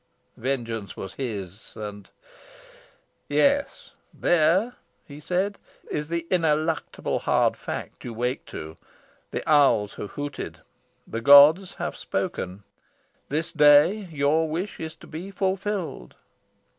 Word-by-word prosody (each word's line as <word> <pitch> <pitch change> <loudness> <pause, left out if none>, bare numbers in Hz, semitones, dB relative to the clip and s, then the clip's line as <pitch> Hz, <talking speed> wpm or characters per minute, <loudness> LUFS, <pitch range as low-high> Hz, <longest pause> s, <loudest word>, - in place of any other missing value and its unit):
Vengeance 115 -5 -3
was 95 - -6
his, 105 -6 -6
and 105 -2 -8 1.2
"Yes, 285 0 +1 0.2
there," 175 +8 +2 0.3
he 145 0 -11
said, 185 +6 -1 0.3
"is 150 0 -3
the 170 0 -2
ineluctable 160 -2 0
hard - - +2
fact - - -7
you 120 - -5
wake 125 +3 -2
to. 80 +1 -8 0.5
The - - -5
owls 140 -9 +4
have 105 - -7
hooted. 145 -1 -5 0.5
The 115 - -5
gods 145 +8 +7
have - - -4
spoken. 95 +2 -4 0.7
This 155 +3 -2
day 150 +7 +5
your 155 +2 +1
wish 175 +6 -4
is 160 0 -6
to - - -15
be 170 +5 -7
fulfilled." 195 -1 -3
150 Hz, 115 wpm, -25 LUFS, 120-175 Hz, 1.2 s, gods